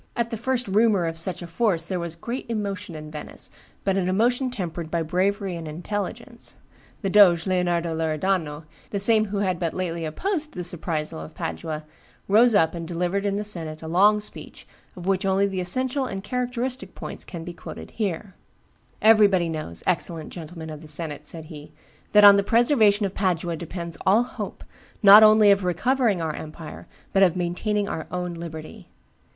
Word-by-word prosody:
At 235 0 -1
the - - -1
first 250 +2 -2
rumor 205 -2 +3
of 165 0 -2
such 175 +2 -2
a - - -5
force 170 -1 0
there 180 +1 -3
was 170 -1 -4
great 235 +9 -5
emotion 200 -6 -4
in 155 0 -8
Venice, 150 -1 -7 0.3
but 195 -1 +1
an 185 -1 0
emotion 245 +7 +1
tempered 175 -8 -5
by 165 0 -1
bravery 190 +3 0
and 165 -1 -6
intelligence. 180 +6 -5 0.5
The 195 - 0
doge, 180 -5 +6
Leonardo 175 -3 0
Loredano, 160 -1 -1 0.3
the 205 - -3
same 215 +2 +6
who 200 -1 -3
had 185 -2 -1
but 170 -3 -2
lately 170 -2 -3
opposed 310 - -2
the 180 - -5
surprisal 165 - -2
of 80 - -10
Padua, 155 - -4 0.4
rose 225 +3 +5
up 160 -4 +3
and 170 -1 -6
delivered 180 +4 -1
in 200 - 0
the 205 - -2
senate 165 -6 -5
a - - -6
long 200 +6 +4
speech, 210 - -10 0.3
of 180 -2 -9
which 195 0 +1
only 195 +1 +2
the 190 -2 -2
essential 255 +9 0
and 195 -3 -5
characteristic 250 +2 -3
points - - -7
can 170 -4 -8
be 175 +1 -7
quoted - - -9
here: 200 -2 -3 0.7
"Everybody 205 -6 +5
knows, 155 - -5
excellent 165 -2 -2
gentlemen 160 -1 -8
of 155 -1 -8
the 155 - -12
senate," 150 -1 -3
said 160 -2 -6
he, 155 -1 -11 0.4
"that 210 0 +7
on 200 -1 +10
the - - +4
preservation 220 -2 +3
of 195 - -3
Padua 175 -3 -1
depends 170 0 -6
all 210 +5 +5
hope, 245 - -7 0.4
not 205 +1 +10
only 215 -1 +7
of 200 -1 +3
recovering 205 +1 +1
our 160 -1 -2
empire, 155 0 -9 0.3
but 195 - +3
of 185 -3 +5
maintaining 200 +4 -1
our 160 - -4
own 180 -1 -3
liberty. 160 -2 -8
185 Hz, 180 wpm, -24 LUFS, 165-210 Hz, 0.7 s, on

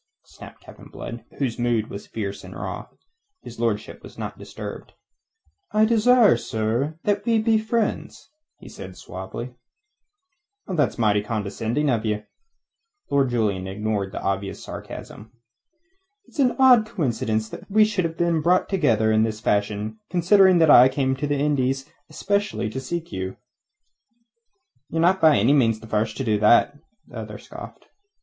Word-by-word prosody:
snapped - - -14 0.3
Blood, 115 -1 -8
whose 125 -4 -2
mood 120 -2 0
was 100 - -8
fierce 100 -3 -5
and - - -10
raw. - - -6 0.6
His - - -11
lordship - - -2
was - - -13
not - - -5
disturbed. - - -9 0.8
"I 215 +1 +4
desire, 230 0 +5
sir, 115 +8 -2
that 205 0 0
we 230 0 +2
be 220 0 +2
friends," 220 +4 -3 0.4
said 95 - -9
he 90 - -14
suavely. 115 +7 -8 1.1
"That's 155 -8 0
mighty 105 -3 +2
condescending 110 +6 -2
of 115 -3 0
you!" 105 -1 -2 0.9
Lord 140 -2 +2
Julian 105 -6 -1
ignored 100 0 -2
the - - -6
obvious 95 0 -3
sarcasm. 110 +2 -9 0.9
"It's - - -15
an 255 -3 +3
odd 250 -5 +6
coincidence 115 - -1
that - - -10
we 215 +1 +5
should 210 -3 -1
have 165 0 -4
been 170 -2 +1
brought 180 +4 +2
together 115 - +2
in 110 0 +3
this 110 -1 -1
fashion, 105 0 -1
considering 185 +2 +5
that 160 -3 +5
I 125 +2 +8
came 135 0 0
out 130 - -3
to 145 - -1
the 145 0 0
Indies 135 -2 0 0.2
especially 200 - -1
to 130 - -4
seek 170 +3 -5
you." 95 0 -5 1.5
"Ye're 165 - -2
not 185 +3 +3
by 155 -7 +6
any 115 +8 +4
means 115 -6 +3
the 110 - -12
first 110 0 -1
to - - -2
do 110 -4 +1
that," 110 +6 +4 0.3
the - - -11
other - - -7
scoffed. - - -11
130 Hz, 155 wpm, -23 LUFS, 110-175 Hz, 1.5 s, I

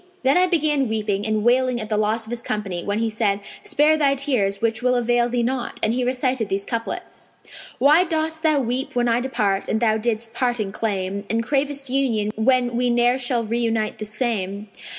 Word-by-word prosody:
Then 270 +2 +4
I 365 +1 +4
began 300 -7 +1
weeping 210 -2 -1
and 215 -1 0
wailing 250 +1 +2
at 215 -1 -5
the 215 - 0
loss 215 +2 0
of 220 - -10
his 240 -1 -3
company 200 -6 -3
when 205 +1 -1
he 225 +1 0
said, 210 -2 0 0.2
'Spare 305 +2 +3
thy 280 -2 +3
tears 240 -8 0
which 225 0 -1
will 250 0 +2
avail 240 0 +2
thee 240 0 0
naught!'; 250 0 -3
and 220 - +3
he 250 +1 0
recited 255 -2 -1
these 195 +1 -1
couplets, 230 -1 -5 0.5
'Why 300 +6 +5
dost 320 -2 -2
thou 310 -2 +3
weep 250 +2 -3
when 245 0 +2
I 235 0 +2
depart 215 -7 -1
and 220 - 0
thou 220 -2 +2
didst 225 0 -2
parting 240 -5 -1
claim; 200 -2 -2
* - - -28
And 230 +1 0
cravest 275 +1 -1
union 230 -6 +1
when 245 +1 +2
we 245 +1 +1
ne'er 240 +2 +3
shall 245 -2 0
reunite 225 -1 -1
the 215 - -4
same? 210 -2 -3
235 Hz, 205 wpm, -22 LUFS, 215-260 Hz, 0.5 s, Why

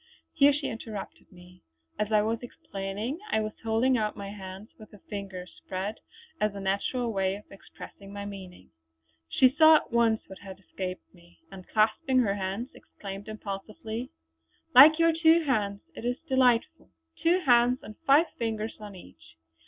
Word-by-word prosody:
Here 285 -2 +5
she 290 +1 -3
interrupted 225 -3 -7
me. 180 0 -17 0.4
As 210 +1 -1
I 210 -1 +4
was 225 +1 -1
explaining 225 - -5
I 220 - +2
was 215 0 -2
holding 230 +3 +2
out 210 -1 -2
my 200 -1 -6
hands 195 +1 -9
with 215 - -13
the 210 - -15
fingers 190 -3 -8
spread 195 +4 -4 0.4
as 210 -1 0
a - - -5
natural 200 +5 -1
way 190 -1 0
of 205 - -11
expressing 195 0 -12
my 200 0 -6
meaning. 190 -3 -10 0.6
She 255 -1 +4
saw 315 +1 +8
at - - 0
once 230 -1 +2
what 190 - -11
had 190 -2 -10
escaped 185 -1 -7
me, 175 - -22
and 185 -1 -11
clasping 220 +4 +1
her 220 -6 +3
hands 200 +5 -4
exclaimed 195 0 -10
impulsively: 215 +3 -6 0.6
"Like 295 +5 +9
your 330 0 +4
two 325 +1 +4
hands! 205 -8 -1
It 280 - -9
is 245 +1 -1
delightful! 255 -3 +2 0.3
Two 350 +3 +3
hands, 245 -3 +3
and 215 - -10
five 285 +5 +6
fingers 225 -1 -3
on 205 -2 -9
each. 80 - -16
215 Hz, 165 wpm, -28 LUFS, 195-250 Hz, 0.6 s, Like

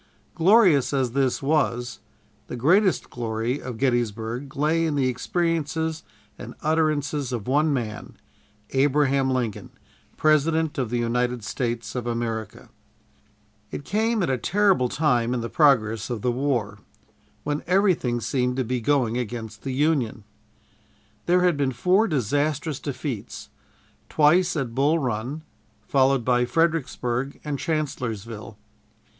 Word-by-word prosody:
Glorious 175 - +4
as 130 -3 +1
this 135 0 0
was, 130 -5 0 0.5
the - - -6
greatest 180 - +2
glory 115 +3 -2
of 125 -3 -6
Gettysburg 120 +1 -1
lay 155 +3 +1
in 160 -3 0
the 135 -2 +2
experiences 160 +3 -1 0.4
and - - -8
utterances 150 -3 0
of 120 -4 -4
one 150 +4 +2
man, 115 -6 -4 0.6
Abraham 135 0 +2
Lincoln, 125 -5 -2 0.5
President 155 0 +2
of 125 -4 -1
the 120 - -1
United 120 0 -1
States 115 0 -3
of 125 -2 -4
America. 115 -2 -4 1.0
It 140 - -7
came 220 - +1
at 170 - 0
a 130 - -1
terrible 195 - +2
time 125 -5 +1
in 120 - -2
the 115 - -4
progress 115 -8 +3
of 120 -4 -4
the 125 - +2
war, 120 -6 -1 0.6
when 145 0 -2
everything 180 -10 +2
seemed 125 0 -1
to 130 - +1
be 125 +1 -2
going 125 -2 +1
against 110 -2 -6
the 135 - -4
Union. 130 -6 0 1.0
There 180 +1 +4
had 180 -3 +3
been 140 -2 +1
four 185 - +3
disastrous 145 - -1
defeats 135 -4 -6 0.6
twice 170 +5 +3
at 135 -6 -2
Bull 145 +6 +2
Run, 130 +2 -3 0.4
followed 135 -3 +2
by 125 -1 +3
Fredericksburg 140 -4 -1
and 145 -2 -3
Chancellorsville. 115 - -4
135 Hz, 130 wpm, -24 LUFS, 120-155 Hz, 1.0 s, Glorious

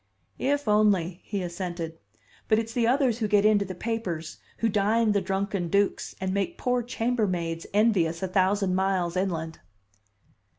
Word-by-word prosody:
"If 285 -1 0
only!" 200 -5 +2
he 200 -3 -3
assented. 170 -2 -5 0.5
"But 215 - +4
it's 225 0 -2
the 235 -1 +2
others 250 -2 +2
who 220 - 0
get 205 0 +3
into 210 -2 +4
the 185 -1 -6
papers, 180 -7 -4 0.2
who 230 - +1
dine 215 +2 +2
the 200 -1 +2
drunken 195 -1 -2
dukes, 200 +4 0
and 190 -1 -2
make 200 -2 -1
poor 250 0 0
chambermaids 205 -9 -1
envious 190 -6 +2
a - - 0
thousand 190 +1 +1
miles 185 -2 0
inland!" 165 -4 -2
200 Hz, 155 wpm, -26 LUFS, 180-220 Hz, 0.5 s, But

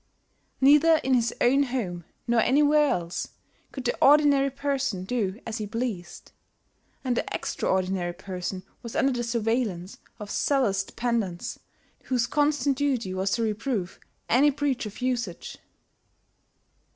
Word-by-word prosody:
Neither 295 +4 +6
in 265 - +1
his 235 -2 +2
own 270 +3 +4
home 215 - -2 0.2
nor 235 -1 +2
anywhere 295 +4 +4
else 170 -4 -2 0.4
could 265 -2 -7
the 240 - +1
ordinary 285 -1 +5
person 270 -8 -2
do 205 -1 -2
as 230 0 -4
he 210 - -3
pleased; 225 -5 -5 0.7
and 255 -2 0
the - - -1
extraordinary 185 -2 -1
person 185 0 -5 0.2
was 235 -2 -8
under 270 - +3
the 240 -1 -2
surveillance 225 -5 -2 0.2
of 210 -1 -7
zealous 230 -9 +1
dependants 220 -6 -3 0.5
whose 250 -3 +1
constant 290 0 +1
duty 255 -10 0
was 190 +1 -1
to 235 - 0
reprove 215 -3 -2 0.3
any 275 +5 +5
breach 275 -4 -1
of 210 - -10
usage. 235 -9 -3
240 Hz, 130 wpm, -26 LUFS, 195-275 Hz, 0.7 s, Neither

